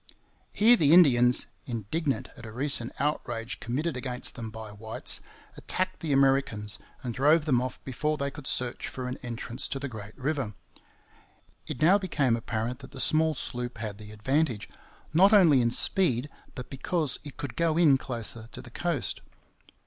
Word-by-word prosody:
Here 230 +4 +6
the 155 -8 +4
Indians, 125 -8 +6 0.2
indignant 130 - -2
at 120 - -12
a - - -8
recent 125 0 +2
outrage 120 -5 -2
committed 145 +6 -2
against 125 -1 -2
them 115 -3 -6
by 110 -1 -8
whites, 110 +2 -2 0.3
attacked 185 0 -1
the 160 -4 -3
Americans 135 -7 +2 0.2
and 120 -2 -3
drove 150 +5 +3
them 130 -6 +3
off 130 0 -4
before 150 +4 -2
they 140 0 -2
could 140 -1 -9
search 125 -1 -1
for 130 -1 -5
an 125 - -4
entrance 120 +1 -3
to - - -3
the 140 +1 -4
Great 110 -3 -9
River. 135 -6 -2 1.1
It 145 - -3
now 190 +5 +6
became 145 - +1
apparent 115 +2 -3
that 130 - -11
the 135 - -7
small 155 +2 +2
sloop 125 -1 -3
had 105 -1 -5
the 105 -1 -10
advantage, 125 +2 0 0.5
not 195 +6 +6
only 165 -10 +6
in 120 - +2
speed, 135 -1 +1 0.2
but 125 - -8
because 145 +2 +1
it 145 -3 -10
could 140 -4 -6
go 165 -1 +1
in 150 -6 +5
closer 115 -3 -3
to - - -8
the 120 - -12
coast. 170 -1 -2
130 Hz, 170 wpm, -28 LUFS, 120-150 Hz, 1.1 s, Here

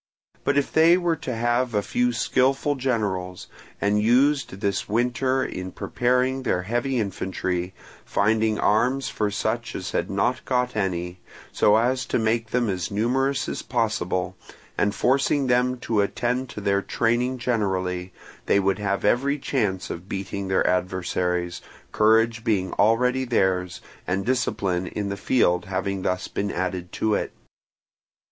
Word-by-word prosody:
But 140 - +1
if 145 - +1
they 165 +2 +6
were 175 -2 +1
to 125 - -4
have 120 +1 0
a 105 - +1
few 125 +3 +1
skilful 130 +4 +1
generals, 105 -9 -2 0.3
and 105 +1 +2
used 125 -2 +2
this 100 0 -1
winter 125 +4 +1
in 90 0 -5
preparing 125 +5 0
their 90 -8 0
heavy 120 +6 -1
infantry, 95 -3 -3 0.3
finding 110 +1 +1
arms 125 +6 +2
for 105 -1 -1
such 110 +3 -2
as 95 - -4
had - - -1
not 120 +6 0
got 125 -1 0
any, 90 -3 -2 0.3
so 105 - +4
as 125 +2 +1
to - - 0
make 115 0 0
them 120 0 +1
as 90 -4 -2
numerous 130 +6 0
as - - -3
possible, 95 -6 -1 0.4
and 100 0 +1
forcing 135 +5 +2
them 125 0 +2
to 110 -4 +1
attend 125 +5 -1
to 105 - -7
their 100 -1 +1
training 120 +5 0
generally, 95 -7 -1 0.4
they 100 - +4
would 95 +1 +1
have 100 -1 -1
every 135 +7 +2
chance 105 -10 -1
of 90 +3 -8
beating 100 0 -4
their 95 0 +2
adversaries, 90 -1 -1 0.3
courage 110 +1 +3
being 95 -5 0
already 125 +5 +2
theirs 95 -7 0 0.3
and 95 +2 -1
discipline 100 -8 0
in 100 +3 -3
the 100 - -2
field 95 -4 +2
having 95 0 -2
thus 90 0 -1
been 100 0 -3
added 90 -1 -3
to 110 -1 0
it. - - -1
110 Hz, 150 wpm, -24 LUFS, 95-125 Hz, 0.4 s, they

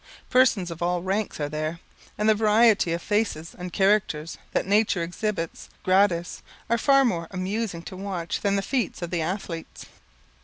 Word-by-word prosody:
Persons 230 -9 +3
of 165 - -8
all 175 0 0
ranks 195 +1 -2
are 145 - -1
there; 155 +2 -3 0.4
and 210 - +1
the 220 - +7
variety 215 -3 +4
of 170 +1 -2
faces 205 -7 -1
and 180 0 -7
characters 190 -5 +1
that - - 0
nature 205 -3 +2
exhibits 175 0 -4
gratis, 185 -2 +2 0.3
are 235 - +3
far 275 +2 +5
more 170 -8 -1
amusing 185 -1 -3
to 185 - -8
watch 185 -3 -4
than 200 -1 +1
the 195 - 0
feats 245 -8 -2
of 170 - -4
the 175 -2 0
Athletes. 170 -1 -5
185 Hz, 165 wpm, -25 LUFS, 170-210 Hz, 0.4 s, the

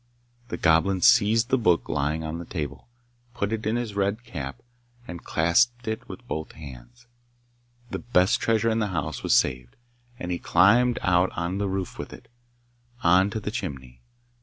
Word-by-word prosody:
The 120 - -5
Goblin 90 +4 +3
seized 110 +6 +4
the 130 - +2
book 90 -7 +2
lying 75 +2 -1
on 80 +1 -4
the 85 - -7
table, 75 -6 -6 0.5
put 100 +2 -1
it 110 -1 -3
in 110 - +1
his 120 -3 -3
red 100 +3 -1
cap, 70 - -7 0.4
and 85 -1 -8
clasped 115 +10 +2
it 110 0 -4
with - - -10
both 80 0 -5
hands. 70 - -12 0.9
The - - -3
best 95 -6 +2
treasure 115 0 +2
in 110 - 0
the 105 - 0
house 80 -6 -3
was - - +2
saved, 65 -1 0 0.4
and 90 -6 -5
he 85 - -2
climbed 115 +7 +4
out 90 0 +3
on 85 +1 -1
to 95 - -3
the 100 -1 -1
roof 95 -1 -4
with - - -6
it - - -14 0.7
on 90 +3 +5
to 110 - -4
the 105 0 -4
chimney. 65 - -6
90 Hz, 180 wpm, -25 LUFS, 80-110 Hz, 0.9 s, on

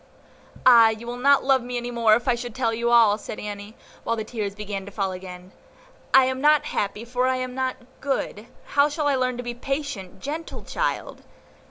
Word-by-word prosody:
"Ah, 235 -3 +8
you 220 +1 -5
will 240 +1 -5
not 275 +3 +4
love 265 -1 +3
me 245 0 -4
any 240 0 -4
more 230 -2 +4
if 240 +3 -3
I 250 - +4
should 240 -1 -6
tell 235 -3 0
you 235 +1 -1
all," 225 -3 +5
said 210 - -7
Annie, 205 +1 -7 0.3
while 230 - 0
the 220 - -3
tears 215 -3 -4
began 205 -2 -5
to - - -8
fall 195 -2 -2
again; 185 0 -9 0.6
"I 265 -1 +7
am 260 0 -2
not 300 0 +4
happy, 210 +2 -3
for 250 +1 0
I 260 - +2
am 255 0 -4
not 260 0 -2 0.2
good; 250 -5 -3 0.2
how 285 +1 +3
shall 300 0 -2
I 285 - +3
learn 255 -1 0
to 245 - -5
be 240 - -4
a - - -9
patient, 275 -7 -4
gentle 310 +4 -6
child? - - -3
240 Hz, 215 wpm, -24 LUFS, 215-260 Hz, 0.6 s, Ah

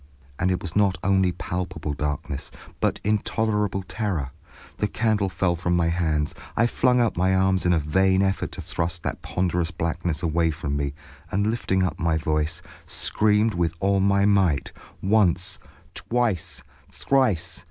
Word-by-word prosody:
And 95 - +2
it 90 - -1
was 85 -2 -5
not 100 -3 +3
only 95 -1 +3
palpable 90 -4 -4
darkness, 70 -1 -3 0.3
but - - 0
intolerable 105 -2 0
terror. 95 - -3 0.5
The 105 - 0
candle 105 -3 +1
fell 90 -1 0
from 90 +1 0
my 85 -1 +2
hands. 80 -3 0 0.2
I 115 - +4
flung 125 +1 +2
out 115 -6 +1
my 95 +1 +3
arms 95 -1 +2
in - - +4
a - - +3
vain 95 +5 +2
effort 95 0 -1
to - - -5
thrust 85 0 -3
that - - -3
ponderous 90 -2 -1
blackness 85 -1 -2
away 85 0 +2
from 75 -2 -3
me, 70 -1 -2 0.3
and 100 +3 +1
lifting 95 -5 0
up 90 - -2
my 85 -2 +1
voice, 75 0 -1 0.2
screamed 105 +1 +2
with 85 -2 0
all 100 0 +2
my 100 +1 +3
might, 95 -8 +2 0.3
once, 95 -3 +2 0.3
twice, 115 -8 -1 0.3
thrice. 95 -11 +1
90 Hz, 155 wpm, -24 LUFS, 85-100 Hz, 0.5 s, I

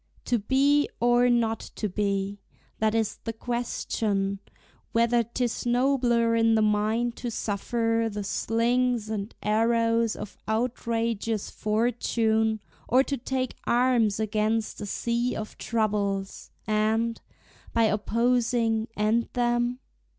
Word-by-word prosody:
To 240 - +1
be, 275 +6 +3
or 240 +1 +4
not 230 -2 +2 0.2
to 215 - -2
be, 200 0 -1 0.4
that 220 0 +1
is 220 -2 0
the 225 - -3
question 215 -4 -2 0.5
Whether 235 +1 +3
't 235 +3 -6
is 240 - -2
nobler 240 -2 +2
in 225 0 +4
the 220 - +3
mind 215 +3 +1
to 245 - -4
suffer 225 +2 -1
The 205 0 -4
slings 230 +2 0
and 205 0 -4
arrows 230 +1 +2
of 200 - -8
outrageous 230 -2 -1
fortune, 220 0 0 0.3
Or 255 +2 +4
to 280 - -2
take 255 0 -3
arms 240 -4 +2
against 215 +1 -1
a 205 - -4
sea 235 +4 -1
of 215 - -6
troubles, 200 -3 -1 0.2
And, 220 +2 0 0.5
by 230 - +2
opposing, 230 +1 +1
end 215 +3 +1
them? 240 0 +1
230 Hz, 120 wpm, -26 LUFS, 215-240 Hz, 0.5 s, or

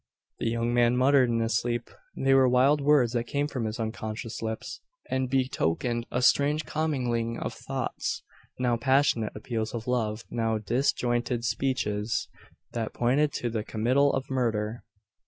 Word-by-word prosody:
The - - 0
young 115 +1 0
man 120 0 +3
muttered 130 -1 +4
in 115 -1 +1
his 115 +1 0
sleep. 120 0 -1 0.3
They 135 0 +3
were 135 -1 +5
wild 135 +4 +4
words 140 -5 +4
that 120 -1 0
came 145 +4 -1
from 130 -6 -3
his 110 +1 -4
unconscious 110 0 -4
lips, 110 0 -5 0.3
and 130 -1 0
betokened 120 -3 0
a 125 - -1
strange 145 +4 +3
commingling 125 -7 -1
of - - -4
thoughts: - - -4 0.3
now 125 -2 +1
passionate 130 -3 +2
appeals 110 +1 -3
of 115 -1 -5
love 115 -3 -1
now 115 -1 0
disjointed 120 +1 0
speeches, 110 -5 -1 0.4
that 115 -2 -4
pointed 135 +5 +2
to 120 - -2
the 110 -2 -2
committal 130 +7 +2
of 135 0 -2
murder! 115 -3 -1
120 Hz, 155 wpm, -27 LUFS, 115-130 Hz, 0.4 s, were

